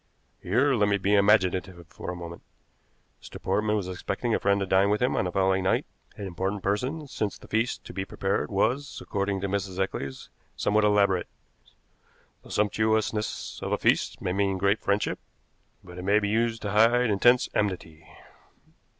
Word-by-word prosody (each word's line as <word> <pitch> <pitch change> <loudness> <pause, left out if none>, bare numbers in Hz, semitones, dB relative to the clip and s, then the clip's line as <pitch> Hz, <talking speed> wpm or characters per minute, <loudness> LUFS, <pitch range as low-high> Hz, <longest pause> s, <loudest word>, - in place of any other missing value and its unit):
Here 130 +10 +2
let 105 -4 +2
me 100 - +2
be 100 +1 0
imaginative 95 -3 +2
for - - -8
a 90 - -4
moment. 85 -1 -8 0.8
Mr. - - -10
Portman 105 +2 0
was 100 -4 -2
expecting 100 +5 -3
a - - +2
friend 100 0 +2
to 100 - -1
dine 95 +1 +3
with 105 +1 +1
him 125 +1 +1
on - - +1
the 90 - -2
following 95 0 +2
night, 95 - +1 0.3
an 100 - -5
important 95 +2 -3
person, 130 +10 -1
since 105 -6 -3
the - - -15
feast 115 +3 -1
to - - -9
be 95 +1 -3
prepared 95 +2 -2
was, 125 +8 0
according 100 -1 -2
to 100 - -1
Mrs. 95 -1 -3
Eccles, 70 -8 -4 0.2
somewhat 105 +1 +2
elaborate. 100 -3 +3 1.1
The - - -16
sumptuousness 110 +1 0
of - - -4
a - - +2
feast - - +1
may 90 - -1
mean 100 0 +1
great 100 +3 +2
friendship, 100 +1 0 0.6
but 90 0 -10
it - - -6
may 100 +2 +3
be 105 -1 0
used 115 +1 0
to 105 - -2
hide 115 +3 +4
intense 120 +5 +4
enmity. 85 -6 -3
100 Hz, 175 wpm, -27 LUFS, 95-110 Hz, 1.1 s, hide